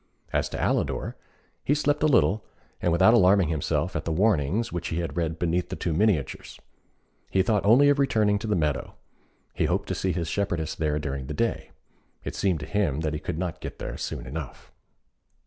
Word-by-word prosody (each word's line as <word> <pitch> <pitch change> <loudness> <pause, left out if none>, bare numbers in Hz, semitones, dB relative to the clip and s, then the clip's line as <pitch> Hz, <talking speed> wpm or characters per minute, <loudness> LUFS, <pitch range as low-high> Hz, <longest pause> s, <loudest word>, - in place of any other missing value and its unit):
As - - +1
to - - -5
Alidor, - - -1 0.5
he 145 - +2
slept 145 0 +1
a 155 - +4
little, 110 -6 +3 0.4
and 85 - +1
without 95 +6 +5
alarming 95 -5 +5
himself 80 -3 -1
at - - -1
the 80 - -3
warnings 100 +3 +1
which 85 0 -3
he 80 - -3
had 85 -1 -3
read 80 -1 -1
beneath 85 +1 0
the - - -4
two 85 - -2
miniatures. 90 - 0 0.7
He 95 - +2
thought 105 -1 +1
only 120 +8 +6
of 145 0 +3
returning 105 -7 +2
to 110 - -5
the 105 - +1
meadow: 75 -4 -1 0.6
he - - 0
hoped - - 0
to - - 0
see 95 - -1
his 85 -2 -2
shepherdess 85 -4 -1
there 75 -1 -1
during 70 -3 -4
the 75 - -5
day. 115 +6 -1 0.5
It - - -5
seemed 90 -6 0
to - - -5
him 85 -9 0
that 80 -1 -1
he 75 - -3
could 75 - -4
not 90 -1 -4
get - - -7
there - - -5
soon - - -5
enough. 70 +1 -7
90 Hz, 200 wpm, -26 LUFS, 80-105 Hz, 0.7 s, only